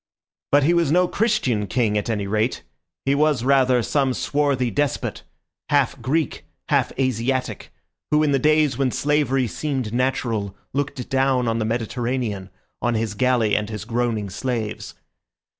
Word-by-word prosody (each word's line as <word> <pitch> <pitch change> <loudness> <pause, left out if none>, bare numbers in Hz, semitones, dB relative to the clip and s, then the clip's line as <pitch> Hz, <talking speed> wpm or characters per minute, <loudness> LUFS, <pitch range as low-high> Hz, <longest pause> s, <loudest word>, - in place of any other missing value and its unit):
But 145 0 +5
he 165 +5 +4
was 170 -4 +2
no 180 +2 +4
Christian 175 - 0
king, 110 +1 +1
at 105 +2 -1
any 105 -3 -1
rate; 110 +4 -1 0.4
he 135 - +3
was, 145 -3 +2
rather, 130 -2 +3
some 135 0 +1
swarthy 140 -4 0
despot, 145 +5 -1 0.5
half 140 -3 +1
Greek, 145 +5 -1 0.3
half - - +2
Asiatic, 130 0 -1 0.4
who 150 0 +3
in 150 - +2
the 135 - +2
days 150 -2 +3
when 135 -2 +2
slavery 140 -1 +1
seemed 125 - -3
natural 115 -6 -1 0.2
looked 135 -2 -3
down 130 -2 +1
on 115 0 0
the 110 - 0
Mediterranean, 115 -3 -2 0.3
on 120 -1 +1
his 110 -2 -1
galley 120 -1 +2
and 105 0 -1
his 105 -1 -6
groaning 115 -4 -1
slaves. 110 0 -4
125 Hz, 150 wpm, -22 LUFS, 115-140 Hz, 0.5 s, But